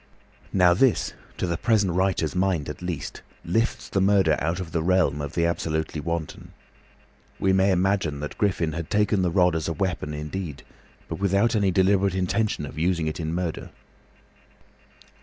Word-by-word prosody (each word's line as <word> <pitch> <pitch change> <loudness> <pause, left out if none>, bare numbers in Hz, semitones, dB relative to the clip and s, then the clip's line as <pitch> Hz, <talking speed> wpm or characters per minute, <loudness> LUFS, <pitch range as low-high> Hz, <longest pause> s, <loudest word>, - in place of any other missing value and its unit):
Now 90 -2 +5
this, 125 +6 +2 0.2
to - - -1
the 85 -1 -1
present 100 -3 +2
writer's 90 -4 +1
mind 90 -6 0
at 75 - -7
least, 85 -6 -5 0.2
lifts 115 +7 0
the 95 - 0
murder 95 -5 +4
out 85 +4 -1
of 90 -3 -6
the 85 - 0
realm 85 -4 +2
of 75 -1 -5
the 85 - +2
absolutely 80 -2 -2
wanton. 85 -1 -5 0.9
We 95 0 +2
may 95 +1 +3
imagine 90 -5 +1
that 75 - -6
Griffin 90 -6 +1
had 85 0 -5
taken 105 -1 +2
the 90 - +2
rod 90 -1 +3
as 80 - -2
a 85 - -1
weapon 80 -3 -2
indeed, 75 0 -5 0.4
but 80 - -5
without 100 +4 +2
any 100 -3 +2
deliberate 95 +1 +2
intention 95 -2 0
of 75 +2 -8
using 85 -1 +1
it 80 +2 -3
in 80 -1 -2
murder. 85 -1 -3
90 Hz, 170 wpm, -25 LUFS, 80-95 Hz, 0.9 s, Now